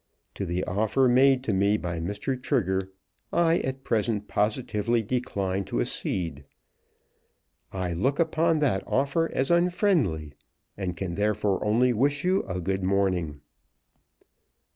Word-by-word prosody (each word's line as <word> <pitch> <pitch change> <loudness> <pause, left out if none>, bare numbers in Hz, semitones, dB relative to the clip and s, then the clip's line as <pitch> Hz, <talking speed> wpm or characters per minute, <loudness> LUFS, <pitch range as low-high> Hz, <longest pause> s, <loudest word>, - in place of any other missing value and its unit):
To 100 - -4
the 90 +2 -1
offer 110 +7 +1
made 130 +1 +4
to 110 - -1
me 100 +2 +3
by 90 -4 -4
Mr. 100 +10 -2
Trigger 95 - 0 0.4
I 170 0 +3
at 135 0 -4
present 110 -3 -1
positively 110 +1 0
decline 100 -5 -2
to - - -2
accede. 75 +3 -2 1.3
I 90 -2 -3
look 130 - 0
upon 165 -1 +2
that 110 -10 +2
offer 145 +5 +1
as 135 +5 0
unfriendly, 170 - +1 0.4
and 90 -3 -4
can 90 -2 -3
therefore 105 0 0
only 120 +4 +3
wish 140 +5 +1
you 185 +2 +2
a 90 -1 -3
good 95 +2 -2
morning." 90 -6 0
105 Hz, 130 wpm, -26 LUFS, 95-135 Hz, 1.3 s, made